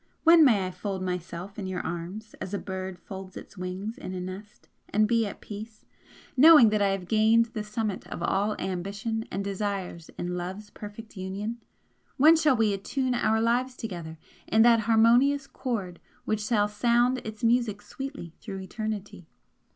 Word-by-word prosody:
when 330 -1 +8
may 215 -9 +4
I 185 - -4
fold 190 0 -4
myself 180 +2 -5
in 195 - -4
your 185 -1 -3
arms 180 +6 -6
as 190 +2 -4
a - - 0
bird 190 -1 -5
folds 190 +1 -9
its - - -11
wings 185 +4 -5
in 185 - -6
a - - -3
nest, 185 +3 -8 0.2
and 215 +1 +3
be 230 -1 +2
at - - -9
peace, 215 +1 -9 0.5
knowing 290 -4 +9
that 210 -1 +1
I 200 - +4
have 195 -2 -2
gained 225 +2 +4
the 215 -3 -3
summit 210 -2 -3
of - - -6
all 205 +2 +1
ambition 200 +5 -3
and 195 +2 -3
desires 195 -4 -4
in 175 0 -3
love's 190 +4 -6
perfect 215 +2 -10
union? 200 +5 -4 0.6
When 310 +5 +7
shall 305 -4 +3
we 220 -2 +3
attune 255 +6 -1
our 220 -2 +2
lives 245 +3 +1
together 170 -7 -6 0.3
in 220 +1 +5
that 235 -1 +6
harmonious 245 +5 +5
chord 205 -11 -4 0.3
which 215 -1 0
shall 210 -2 +2
sound 240 +4 +2
its 215 -1 -9
music 230 -3 +2
sweetly 270 - -7
through 195 -3 -6
eternity? 205 -3 -5
210 Hz, 170 wpm, -27 LUFS, 190-230 Hz, 0.6 s, knowing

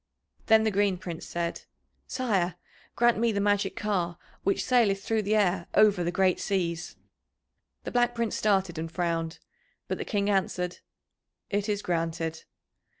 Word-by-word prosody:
Then 220 -1 +6
the 220 - +2
Green 200 -1 +2
Prince 175 -2 -7
said: 170 0 -3 0.4
"Sire, 195 -9 0 0.4
grant 240 -1 +3
me 235 0 +3
the 200 - -1
magic 205 -1 +1
car 180 -5 -1 0.3
which 200 - +1
saileth 210 -6 +3
through 225 0 +1
the 210 +1 +1
air 185 -4 +2
over 205 -4 +5
the 170 - 0
great 185 -1 +2
seas." 170 -4 -2 0.9
The - - -5
Black 240 -1 +2
Prince 235 -2 -1
started 190 -5 +1
and 165 0 -4
frowned, 165 -2 -1 0.5
but - - -3
the - - -1
King 200 -2 -1
answered, 180 -3 0 0.7
"It 205 +1 0
is 205 -1 -1
granted." 165 -1 -2
195 Hz, 150 wpm, -28 LUFS, 175-210 Hz, 0.9 s, Then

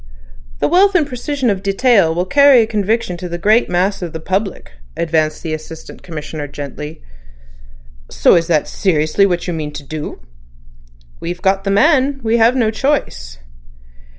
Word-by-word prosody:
"The - - 0
wealth 385 +4 +3
and 330 -4 +3
precision 260 -1 -2
of 190 -2 -3
detail 195 -4 +2
will 175 +1 0
carry 275 +1 +5
conviction 215 -3 -1
to 180 +1 -7
the 170 - -4
great 215 +7 +2
mass 185 +3 0
of 175 -3 -5
the 160 - -5
public," 190 +4 -3 0.3
advanced 155 -2 -1
the 160 -2 -3
Assistant 155 +1 -9
Commissioner 155 -2 -7
gently. 145 +2 -8 1.1
"So 170 - +4
that 165 -2 +1
is - - -12
seriously 175 +1 +1
what 175 -2 -2
you 175 - -2
mean 150 -2 -5
to 145 0 -8
do." 150 - -7 1.0
"We've 175 +1 -6
got 195 +1 +1
the - - 0
man; 275 +5 +3
we 225 +1 +1
have 230 +2 +4
no 230 -4 +1
choice." 65 - -2
190 Hz, 160 wpm, -17 LUFS, 160-230 Hz, 1.1 s, carry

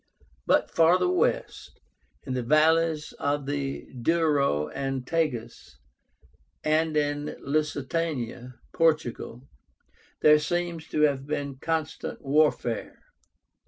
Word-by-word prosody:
But - - +2
farther 175 +2 +4
west, 180 -2 -1 0.5
in 130 - -3
the 125 - -1
valleys 155 +3 +2
of 145 0 -1
the 140 -1 -3
Douro 140 - +1
and 135 - -3
Tagus, 150 -7 -3 0.9
and 155 0 +1
in 145 0 -1
Lusitania 140 -4 -2 0.2
(Portugal), 135 -5 0 0.7
there 150 0 +7
seems 170 +1 -2
to 150 - -1
have 140 -2 +2
been 140 -2 -3
constant 160 -1 -3
warfare. 140 -5 0
150 Hz, 95 wpm, -26 LUFS, 135-160 Hz, 0.9 s, there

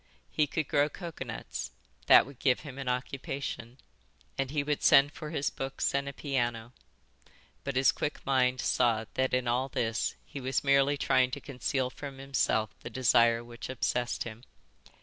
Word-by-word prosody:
He 150 - +2
could 155 0 -2
grow 145 +1 +2
coconuts; 155 -10 -6 0.4
that - - +8
would 140 -2 -13
give 130 -3 +2
him 140 -3 -9
an 135 -2 -3
occupation; 125 -1 -4 0.6
and 135 -1 -1
he 145 0 0
would 150 0 -1
send 140 +1 +6
for 155 0 -7
his 145 -3 -1
books 135 0 -2
and 140 0 0
a - - -5
piano; 120 -5 -2 0.9
but 140 -1 -3
his 130 +1 +5
quick 150 - -4
mind 130 -2 +2
saw 115 -2 +2
that 130 0 0
in 125 -1 -1
all 125 +3 +1
this 115 -3 -1
he 140 -2 -8
was 130 +1 -1
merely 140 +1 +4
trying 130 -2 +3
to - - -5
conceal 130 -1 -2
from 140 -1 -8
himself 135 -5 0
the - - -8
desire 115 -2 +3
which 120 +1 -9
obsessed 125 -1 -1
him. 115 0 -8
130 Hz, 170 wpm, -30 LUFS, 125-140 Hz, 0.9 s, that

